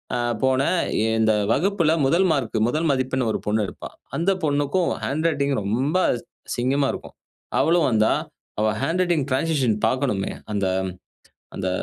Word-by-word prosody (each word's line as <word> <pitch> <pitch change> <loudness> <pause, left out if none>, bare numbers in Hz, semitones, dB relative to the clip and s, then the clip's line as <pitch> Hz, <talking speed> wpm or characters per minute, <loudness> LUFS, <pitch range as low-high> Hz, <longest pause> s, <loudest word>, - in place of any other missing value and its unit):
ஆ - - 0 0.3
போனேன் 130 +7 +2 0.2
எ - - +2
இந்த 110 0 +3 0.2
வகுப்பில 170 - +2
1 170 +7 +3
மார்க், 130 -7 -1
1 155 +6 0
மதிப்பெண் 130 -2 0
ஒரு - - -2
பொண்ணு 105 +1 +1
எடுப்பா! - - -8 0.3
அந்த 170 +4 +2
பொண்ணுக்கும் 145 +4 +1
ஹேண்ட் 155 +4 -1
ரைட்டிங் 140 -3 0
ரொம்ப 125 - -1 0.6
அசிங்கமாக 135 +3 +1
இருக்கும். - - -9 0.4
அவளும் 165 -1 +3
வந்தா! 110 -2 +3 0.5
அவ 110 - +3
ஹேண்ட் 175 +3 0
ரைட்டிங் 170 -6 +1
டிரான்சிஷன் 130 -5 +1
பார்க்கணுமே 130 -7 -1 0.2
அந்த 100 -2 0 0.9
அந்த 95 -1 -2
140 Hz, 140 wpm, -23 LUFS, 120-160 Hz, 0.9 s, இந்த